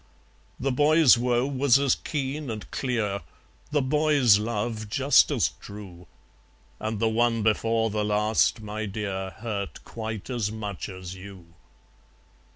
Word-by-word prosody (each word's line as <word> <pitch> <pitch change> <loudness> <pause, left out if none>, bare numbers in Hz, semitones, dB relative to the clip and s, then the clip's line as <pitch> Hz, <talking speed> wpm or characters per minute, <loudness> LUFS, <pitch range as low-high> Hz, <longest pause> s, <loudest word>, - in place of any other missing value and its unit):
The 135 +1 0
boy's 150 +1 +5
woe 120 +1 +1
was 135 -2 +3
as 140 -2 +3
keen 140 0 -4
and 110 -2 -6
clear, 110 -6 -1 0.5
The 145 -2 +1
boy's 140 -6 +4
love 110 0 -3
just 135 +4 +4
as - - +1
true, 95 -4 -10 0.7
And 110 -1 -3
the 115 - +2
One 115 0 +1
Before 115 +1 +1
the 105 0 -1
Last, 105 +2 +2
my 110 0 -4
dear, 95 -2 -4
Hurt 100 0 -5
quite 110 -2 -6
as 115 -4 -1
much 105 -3 -5
as 95 -1 -8
you. 95 -3 -12
110 Hz, 135 wpm, -26 LUFS, 105-125 Hz, 0.7 s, boy's